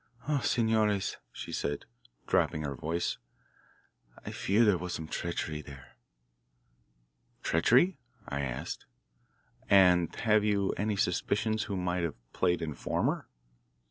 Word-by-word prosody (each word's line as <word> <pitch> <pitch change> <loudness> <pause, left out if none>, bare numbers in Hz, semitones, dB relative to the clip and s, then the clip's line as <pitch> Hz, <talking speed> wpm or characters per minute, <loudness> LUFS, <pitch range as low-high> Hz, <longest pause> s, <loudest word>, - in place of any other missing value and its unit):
Ah, 150 -2 +2
senores," 110 -6 +1
she - - -7
said, 70 0 -2 0.4
dropping 75 - +1
her 70 -1 -2
voice, 80 +6 -2 1.1
"I - - -4
fear 105 +5 +2
there 105 -3 +5
was 90 +1 -4
some 80 - -5
treachery 80 -2 -3
there." 70 -2 -13 1.5
"Treachery?" 130 - +4 0.3
I 70 +1 -2
asked. 65 -2 -4 0.8
"And 90 -3 +5
have 110 -2 +4
you 100 -2 +2
any 105 +1 -1
suspicions 110 +4 0
who 100 - -3
might 90 0 -1
have 80 -5 -2 0.2
played 90 -2 +1
informer?" 75 -3 -1
90 Hz, 115 wpm, -30 LUFS, 80-105 Hz, 1.5 s, there